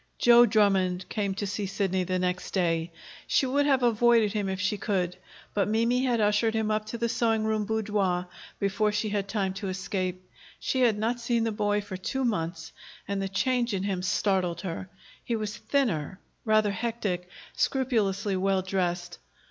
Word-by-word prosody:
Joe 240 0 +7
Drummond 190 -4 +2
came 200 -3 -1
to 205 - -3
see 200 0 -3
Sidney 190 -1 0
the 185 +1 -1
next 180 +1 -2
day. 170 -2 +1 0.4
She 275 - +3
would 285 +3 +1
have 265 -3 +3
avoided 235 -2 +4
him 205 -3 -1
if 190 -1 -3
she 195 +2 0
could, 185 -4 -1 0.4
but 200 -2 +1
Mimi 230 +4 +2
had 240 -3 +1
ushered 210 +2 +2
him 220 -1 0
up 215 0 -1
to 235 - -4
the 235 0 0
sewing 225 -1 +1
room 215 -1 0
boudoir 205 -5 0 0.3
before 205 +2 +1
she 210 +1 -1
had 200 -1 -1
time 195 -2 -1
to 195 0 -4
escape. 185 -1 -3 0.3
She 260 - -1
had 230 -4 +4
not 230 +3 -1
seen 235 -1 0
the 225 - 0
boy 205 0 0
for 195 -2 -7
two 265 +8 -2
months, 165 -6 -2 0.4
and 200 -1 -2
the 195 - -2
change 240 +2 0
in 190 - -2
him 195 -2 -1
startled 185 -2 0
her. 185 -1 -5 0.3
He 235 - -1
was 215 -1 -3
thinner, 190 - -1 0.3
rather 215 -2 +3
hectic, 200 -5 -3 0.2
scrupulously 210 -7 0
well 190 0 +1
dressed. 180 -2 -2
205 Hz, 180 wpm, -27 LUFS, 185-225 Hz, 0.4 s, Joe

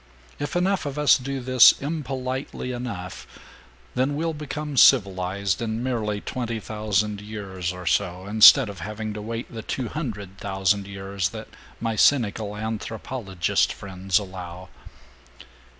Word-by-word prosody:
If 145 +3 -4
enough 185 -2 +1
of 140 0 -5
us 150 -1 +6
do 135 +1 -4
this 130 -1 +7
impolitely 135 -3 -4
enough, 115 -7 -6 0.7
then 135 +3 0
we'll 165 +2 -1
become 150 0 -5
civilized 100 -5 +3
in 115 +1 -2
merely 110 -5 -2
twenty 115 -3 -3
thousand 105 -1 -1
years 100 -4 -5
or 90 0 -9
so, 90 +2 0
instead 110 +5 +8
of 100 -3 -8
having 105 +4 -5
to 105 - -6
wait 115 +3 -6
the 115 - -5
two 125 +2 -3
hundred 105 - -6
thousand 95 0 0
years 95 -2 -3
that - - -9 0.3
my 115 -1 -2
cynical 110 -4 +2
anthropologist 110 -3 -2
friends 95 -1 -1
allow. 95 -2 -6
110 Hz, 135 wpm, -24 LUFS, 95-130 Hz, 0.7 s, instead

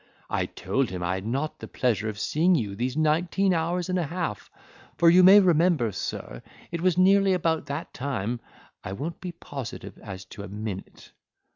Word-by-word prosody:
I - - 0
told 120 +7 -1
him 90 -1 -5
I 85 +1 0
had 95 +2 -4
not 140 +6 -1
had - - -39
the - - -8
pleasure 110 -3 0
of 105 - -6
seeing 165 - +2
you 105 -9 -2
these 125 +6 -2
nineteen 170 +5 +2
hours 170 +1 -1
and 185 0 0
a 165 - -1
half; 170 - -4 0.5
for 170 -1 +6
you 180 +2 +7
may 190 +3 +9
remember, 170 - +3
sir, - - -5 0.3
it 170 -1 -3
was 180 -1 +2
nearly 195 +1 +5
about 160 -4 0
that 145 +4 -5
time; 125 -4 -3 0.4
I 95 - -5
won't 155 +10 -5
be 180 - -4
positive 140 -7 -8
as 95 -2 -8
to 105 - -8
a 100 - -7
minute." 100 -1 -7
150 Hz, 190 wpm, -26 LUFS, 110-175 Hz, 0.5 s, may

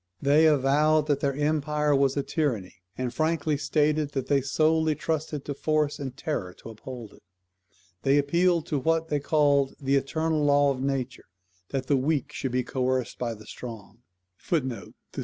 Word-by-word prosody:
They 150 +3 +4
avowed 150 +2 +3
that 145 -2 +1
their 140 -1 0
empire 150 0 +1
was 135 0 +2
a 140 - +1
tyranny, 125 - -2 0.2
and 125 -1 -3
frankly 155 0 0
stated 150 0 0
that 135 -2 -2
they 140 0 +2
solely 155 +3 +2
trusted 155 -1 -3
to 145 - -3
force 155 +1 0
and 135 -2 -6
terror 100 - -3
to - - -11
uphold 115 0 -9
it. - - -19 0.8
They 135 +1 +3
appealed 170 +3 +2
to 145 - -1
what 165 +3 0
they 150 - +1
called 140 -2 +2
"the 140 0 +2
eternal 155 +2 0
law 145 -1 +4
of 130 -1 -4
nature, 135 -2 -3 0.4
that 135 -2 -2
the 140 +1 +2
weak 145 +2 0
should 130 - -4
be 125 0 0
coerced 130 0 -2
by 120 -2 -2
the 110 0 -14
strong." 115 -3 -9 0.4
[THUC. 130 -8 -3
145 Hz, 170 wpm, -26 LUFS, 130-155 Hz, 0.8 s, They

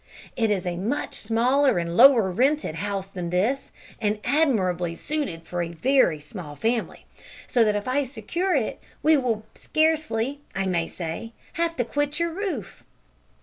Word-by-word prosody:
It 225 -2 +1
is 195 -4 0
a 175 -1 -2
much 225 +11 -2
smaller 250 +4 +2
and 170 0 -2
lower 235 -6 +7
rented 270 - +1
house 195 +3 -3
than 180 -3 -5
this, 215 +10 0 0.3
and 210 -1 0
admirably 190 - +1
suited 190 - -3
for 175 +1 -3
a 170 - -2
very 170 - +2
small 150 0 -9
family, 225 +6 -2 0.4
so 240 - +3
that 210 -1 +2
if 205 +2 -3
I 275 +3 +2
secure 295 - -2
it 250 -6 -1 0.2
we 315 +1 +6
will 235 -6 0
scarcely, 310 -5 0 0.2
I 195 0 0
may 170 -3 0
say, 175 +7 -6 0.2
have 335 0 -1
to 245 - 0
quit 290 +4 -1
your 335 0 0
roof." 390 +1 -4
225 Hz, 160 wpm, -25 LUFS, 180-280 Hz, 0.4 s, lower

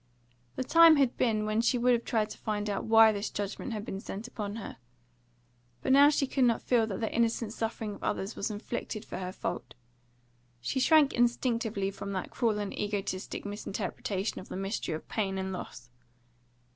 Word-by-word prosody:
The - - -2
time 330 +4 +7
had 275 -4 +2
been 215 -3 +1
when 215 +1 +1
she 245 +2 +2
would 245 +1 +4
have 235 -1 +1
tried 215 -2 0
to - - -8
find 210 -1 -2
out 200 - -3
why 225 0 +7
this 205 0 -3
judgment 205 +5 -4
had 215 -2 -4
been 195 - -5
sent 205 +3 -6
upon 210 -4 -5
her. 225 - -7 1.1
But - - +1
now 280 +2 +8
she 290 -2 +1
could 265 -1 +2
not 235 -2 +2
feel 235 -3 +2
that 195 -1 -4
the 220 - -2
innocent 230 -1 0
suffering 225 -2 -3
of - - -12
others 195 +3 -2
was 200 - -2
inflicted 215 0 -5
for - - -6
her 180 -1 -4
fault; 170 -9 -5 0.8
she 125 - -2
shrank 300 +1 +5
instinctively 230 -4 +1
from 200 0 -6
that 185 - -4
cruel 225 -4 +1
and 205 -1 -3
egotistic 200 -2 -3
misinterpretation 205 -1 -3
of - - -11
the - - -5
mystery 195 -4 -2
of 155 - -9
pain 195 -3 -1
and 190 0 -3
loss. 125 -8 -8
215 Hz, 190 wpm, -30 LUFS, 200-235 Hz, 1.1 s, now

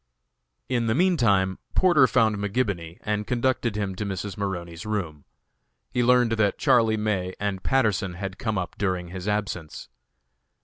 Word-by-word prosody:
In 120 -3 0
the 110 - +2
meantime 115 - +2 0.2
Porter 165 -8 +5
found 110 -2 +3
McGibony, 100 -5 -2
and 105 0 -2
conducted 125 -2 0
him 100 -2 -2
to 105 - -2
Mrs. 100 -1 -4
Maroney's 85 -4 -4
room. 90 -9 -4 0.7
He 125 -1 +1
learned 125 -1 +4
that 110 -3 +1
Charlie 110 -2 +3
May 95 -4 -1
and 100 -2 -2
Patterson 105 -8 +1
had 95 +1 -6
come 110 -3 -1
up 90 -1 -3
during 90 -3 -1
his 90 +2 -7
absence. 100 -6 -3
105 Hz, 145 wpm, -25 LUFS, 95-115 Hz, 0.7 s, Porter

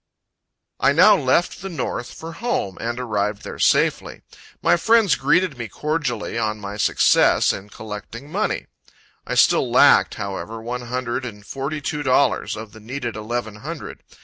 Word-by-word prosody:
I 140 - +4
now 185 +7 +7
left 160 +3 +1
the 195 - -5
north, 155 -7 -4
for 165 +1 -8
home, 165 - -3
and 120 +1 -3
arrived 105 -4 -2
there - - -8
safely. - - +1 0.4
My - - +4
friends 220 0 +4
greeted 150 0 +1
me 115 - -4
cordially 140 -6 -2
on 110 -1 -1
my 100 0 -6
success - - +4
in 95 +2 -8
collecting 110 +7 -9
money. - - -1 0.6
I - - -2
still - - +4
lacked, - - +5
however, 105 +2 -5
one 120 +2 -5
hundred 125 +1 -3
and 105 -4 -8
forty 140 +5 -4
two 150 +1 -3
dollars 135 -3 +2
of 110 -1 -8
the 110 - -13
needed 120 +2 -5
eleven 110 0 -4
hundred. 150 +7 -8
125 Hz, 155 wpm, -22 LUFS, 110-150 Hz, 0.6 s, now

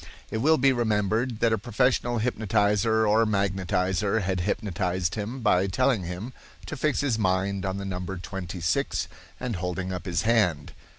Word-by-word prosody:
It 110 - -1
will 155 +6 +4
be 135 +1 +4
remembered 110 +1 0
that 115 -1 +3
a 110 - 0
professional 120 +2 +1
hypnotizer 110 -1 +1
or 110 +2 +4
magnetizer 95 0 0
had 95 0 -1
hypnotized 90 -2 -1
him 110 +5 -4
by 95 -4 +3
telling 95 +2 +1
him 90 +9 -6 0.3
to - - -5
fix 150 +1 0
his 130 -6 0
mind 95 0 0
on 95 +1 -2
the 100 - -5
number 90 0 -4
twenty 90 -1 -6
six 85 - 0 0.3
and 125 -6 -3
holding 90 +1 -3
up 90 +2 -6
his 90 0 0
hand. 105 -11 +1
100 Hz, 165 wpm, -26 LUFS, 95-115 Hz, 0.3 s, will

